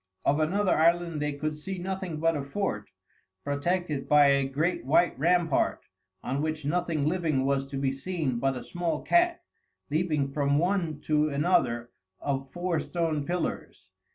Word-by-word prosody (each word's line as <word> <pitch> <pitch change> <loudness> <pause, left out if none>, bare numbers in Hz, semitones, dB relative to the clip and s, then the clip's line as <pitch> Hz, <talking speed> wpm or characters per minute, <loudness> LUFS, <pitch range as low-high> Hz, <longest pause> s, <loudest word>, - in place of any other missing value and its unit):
Of 145 +2 +3
another 185 +5 +2
island 170 -1 +2
they 150 0 -1
could 150 +1 -3
see 190 +5 -5
nothing 185 -3 -4
but 165 +1 +2
a 145 - -2
fort, 140 - -3 0.5
protected 145 +1 -1
by 145 -1 +6
a 140 -1 +3
great 155 +5 -1
white 155 +7 +3
rampart, 170 -1 +2 0.4
on 135 +3 -2
which 155 -1 -3
nothing 160 -1 0
living 155 -5 +1
was 135 0 0
to 135 - -4
be 135 -1 0
seen 135 -3 -2
but 135 0 0
a 125 - -7
small 165 +5 -3
cat, 345 0 +2 0.5
leaping 155 -4 0
from 140 -1 +2
one 170 -3 0
to 150 0 +2
another 140 -6 +1 0.3
of 135 -1 -3
four 175 0 -1
stone 160 -5 -2
pillars. 180 +1 -4
155 Hz, 155 wpm, -28 LUFS, 140-175 Hz, 0.5 s, by